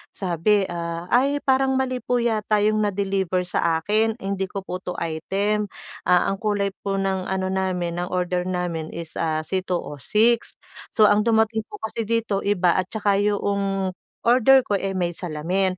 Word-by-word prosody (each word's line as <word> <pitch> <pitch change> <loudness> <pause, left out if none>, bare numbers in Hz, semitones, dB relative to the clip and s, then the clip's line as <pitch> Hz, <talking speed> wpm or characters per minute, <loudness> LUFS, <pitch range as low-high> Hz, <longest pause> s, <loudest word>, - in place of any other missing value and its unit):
sabi 195 +2 +1
ah: 170 0 -4
"Ay, 280 +4 +3
parang 265 0 +2
mali 255 -1 0
po 245 - -1
yata 215 -2 +1
'yong 215 0 +2
na-deliver 195 -3 0
sa 170 -2 0
akin. 220 +3 +1
Hindi 195 0 -2
ko 195 - -5
po 180 - -4
'to 180 - -5
item 200 +6 -1 0.4
ah, 180 -1 +4
ang 195 - -2
kulay 205 -2 0 0.2
po 195 - 0
ng 190 -1 -1
ano 190 0 -1
namin 180 -3 -1
ng 180 - -2
order 180 0 0
namin 175 -3 -2
is 165 -1 -7
ah 155 -1 0
C206 185 - 0 0.4
So, 215 - +5
ang 205 +1 +3
dumating 220 -1 +2
po - - -9
kasi 225 +1 -3
dito 225 -3 0
iba, 185 -3 +3
at 185 -1 0
'tsaka 205 -2 +1
'yong 200 -2 0 0.3
order 255 +2 +5
ko 205 - 0
eh, 195 0 -3
may 175 -2 0
salamin. 180 +3 -1
195 Hz, 165 wpm, -23 LUFS, 180-215 Hz, 0.4 s, So